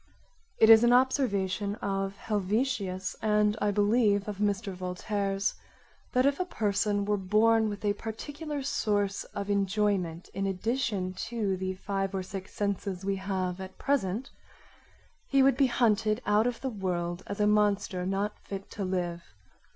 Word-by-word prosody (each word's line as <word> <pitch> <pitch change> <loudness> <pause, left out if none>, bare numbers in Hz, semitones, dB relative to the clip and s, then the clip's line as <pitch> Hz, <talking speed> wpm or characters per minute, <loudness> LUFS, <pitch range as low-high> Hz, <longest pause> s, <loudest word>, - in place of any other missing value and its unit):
It 220 0 +7
is 225 +1 +9
an 240 0 +5
observation 205 -6 +1
of 195 -2 -2
Helvetius 205 -2 -1
and, 210 -1 +2
I 210 - +2
believe, 205 0 +2
of 205 -2 -5
Mr. 205 -1 0
Voltaire's, 195 +2 -2 0.6
that 255 +1 +3
if 280 +3 +2
a - - +2
person 205 - 0
were 210 0 +1
born 220 +3 +3
with 205 0 -6
a 205 - +3
particular 290 +7 -5
source 205 -6 0
of 200 0 -4
enjoyment, 195 -4 0
in 195 +1 -1
addition 205 -1 -1 0.2
to 215 -5 -1
the 185 0 -3
5 195 0 -2
or 190 - -2
6 190 0 -7
senses 200 -2 -3
we 195 0 0
have 190 -1 -2
at 190 0 -9
present, 250 -3 -1 1.0
he 275 -1 +4
would 270 -1 +5
be 270 0 +4
hunted 220 -3 +2
out 210 +3 +3
of 245 -1 -3
the 265 - -2
world 175 -3 -2
as 200 - -5
a 210 - +3
monster 205 -3 +2
not 195 +3 -2
fit 195 -1 -8
to 200 - -4
live. 175 -2 -2
205 Hz, 155 wpm, -29 LUFS, 190-220 Hz, 1.0 s, is